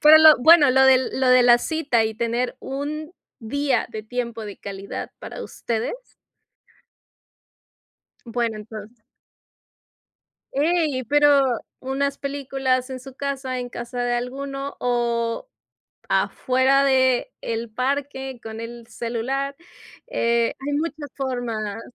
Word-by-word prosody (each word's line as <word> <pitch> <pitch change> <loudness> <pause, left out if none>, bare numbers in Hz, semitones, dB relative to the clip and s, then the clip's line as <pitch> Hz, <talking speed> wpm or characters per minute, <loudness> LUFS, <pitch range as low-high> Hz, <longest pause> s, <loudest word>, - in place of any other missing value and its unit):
pero 310 +1 +9
lo 315 -1 +9
bueno, 300 0 +7
lo 265 +1 +5
de 265 -1 +7
lo 260 -1 +1
de 255 0 +7
la 240 0 +7
cita 280 -6 +1
y 220 0 -2
tener 235 +2 -1
un 300 +4 -5 0.3
día 270 +2 0
de 215 -2 -6
tiempo 235 -1 -4
de 205 -1 -8
calidad 200 0 -6
para - - -7
ustedes 230 -1 -3 2.3
Bueno, 230 -1 -1
entonces 215 +1 -10 1.5
Ey, 295 -3 +1
pero 280 -2 +4 0.2
unas 275 +1 -2
películas 270 -2 -1
en 260 - -4
su 265 +1 -12
casa, 265 -2 -3
en 245 - -5
casa 240 0 -6
de 245 0 0
alguno 275 +3 -4
o 235 - 0 0.6
afuera 260 +2 +2
de 260 -2 +3
el 230 0 -4
parque, 265 0 -2
con 225 0 -7
el 235 0 -8
celular, 260 +4 -3 0.5
eh, 235 - +1
hay 285 +2 -3
muchas 305 -1 -3
formas. 230 -5 -3
255 Hz, 120 wpm, -23 LUFS, 235-275 Hz, 2.3 s, pero